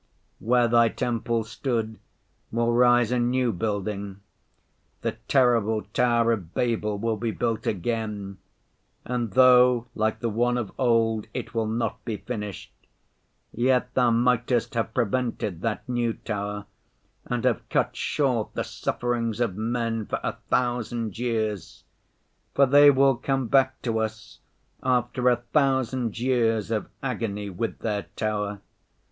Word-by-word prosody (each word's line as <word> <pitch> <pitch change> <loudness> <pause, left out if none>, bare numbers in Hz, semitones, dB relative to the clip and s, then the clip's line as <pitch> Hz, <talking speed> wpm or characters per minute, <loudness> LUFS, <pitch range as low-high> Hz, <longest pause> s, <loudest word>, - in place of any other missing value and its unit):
Where 120 +1 +3
Thy 115 0 +4
temple 115 -1 -1
stood 110 -1 -3 0.5
will 115 +1 +1
rise 120 -1 +4
a 125 - +1
new 125 0 +1
building; 100 0 -3 0.8
the - - 0 0.2
terrible 115 -5 +3
tower 120 -1 +3
of 95 -7 -4
Babel 110 -4 0
will 115 +1 -1
be 115 +2 -2
built 115 0 -2
again, 105 -1 -3 0.7
and 120 -3 -2
though, 125 -2 +6
like 110 -1 0
the 115 - -1
one 120 +3 +1
of 115 -5 -3
old, 115 -3 +2
it - - -5
will 115 -1 0
not 110 -1 -2
be 110 -2 -3
finished, 105 -5 -6 0.8
yet 125 +1 +1
Thou 125 -2 +3
mightest 120 +1 +1
have 115 -1 -1
prevented 115 -6 -1
that 115 0 -3
new 120 -2 0
tower 105 -1 -4 0.6
and 120 -1 -2
have 125 -4 0
cut - - 0
short 125 -7 -1
the - - -1
sufferings 120 -2 -2
of 115 -6 0
men 115 0 -2
for - - -2
a - - -1 0.2
thousand 120 -3 -1
years; 110 -7 -2 0.7
for 140 - +6
they 145 +2 +7
will 135 -1 +4
come 135 +1 -1
back 130 0 +3
to 115 -2 0
us 110 0 -5 0.4
after 125 0 +1
a 125 - +4 0.2
thousand 130 -5 +1
years 115 -3 +1
of 110 -2 -1 0.2
agony 105 -6 -3
with 110 +5 -3
their 105 -2 -3
tower. 105 -2 -2
115 Hz, 135 wpm, -25 LUFS, 110-125 Hz, 0.8 s, they